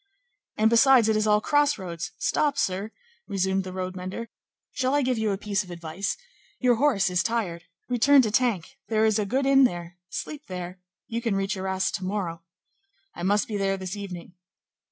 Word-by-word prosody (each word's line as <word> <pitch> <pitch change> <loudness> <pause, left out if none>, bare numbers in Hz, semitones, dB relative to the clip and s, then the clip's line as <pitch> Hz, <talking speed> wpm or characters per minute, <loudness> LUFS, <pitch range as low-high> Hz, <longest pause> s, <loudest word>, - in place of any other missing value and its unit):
"And, 220 +1 +4
besides, 240 -1 +6
it 220 - +3
is 215 0 +1
all 210 0 +5
crossroads; 210 - 0
stop! 290 -2 +1
sir," 195 +3 -1 0.4
resumed 190 0 0
the 185 - -7
road 185 0 -4
mender; 185 +5 -6 0.4
"shall 260 +2 0
I 290 - +3
give 250 -2 0
you 220 -1 +1
a 195 - 0
piece 205 0 -1
of 185 - -15
advice? 170 +2 -4 0.4
your 245 -2 +3
horse 245 -9 +2
is 180 0 +2
tired; 195 -8 -2 0.2
return 260 +3 +5
to 215 - 0
Tinques; 225 -7 +1
there 220 -1 +2
is 220 -1 +2
a 205 - -1
good 265 +5 0
inn 275 0 +6
there; 175 -6 -1
sleep 300 +8 -6
there; 180 0 -6 0.3
you 230 +1 -3
can 230 -4 0
reach 195 0 -1
Arras 190 0 -1
to 190 - -4
morrow." 185 -4 -3 0.7
"I - - -9
must 205 +4 +2
be 210 - -3
there 195 -1 0
this 190 +1 -5
evening." 180 -4 -8
200 Hz, 190 wpm, -26 LUFS, 185-235 Hz, 0.7 s, besides